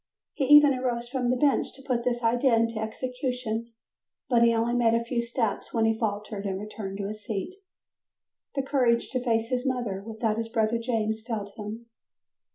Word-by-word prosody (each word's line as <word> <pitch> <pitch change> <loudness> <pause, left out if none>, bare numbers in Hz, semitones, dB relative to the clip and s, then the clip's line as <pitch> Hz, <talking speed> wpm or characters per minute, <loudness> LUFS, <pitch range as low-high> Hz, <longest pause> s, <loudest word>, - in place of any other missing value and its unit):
He 275 - 0
even 295 0 +8
arose 245 -2 -2
from 250 -1 -1
the 250 - +3
bench 280 +2 +2
to 270 - -15
put 250 -3 -1
this 240 -1 -1
idea 240 +2 +3
into 230 -1 +1
execution, 245 0 -3 0.6
but 240 -2 +4
he 235 0 +6
only 230 +1 +1
made 235 -2 +3
a 230 - +1
few 235 0 0
steps 235 -2 -2
when 225 -1 +3
he 225 0 +3
faltered 210 -2 -3
and 190 -1 -2
returned 205 -2 -6
to 200 -1 -3
his 215 0 -7
seat, 215 - -4 1.0
the 275 - 0
courage 250 -4 +2
to 255 -1 -1
face 225 -2 +1
his 250 -1 0
mother 240 -8 -2
without 220 0 -2
his 225 0 -3
brother 225 0 +1
James 220 -2 -1
failed 220 -3 -4
him. 220 +1 -7
235 Hz, 185 wpm, -27 LUFS, 220-250 Hz, 1.0 s, even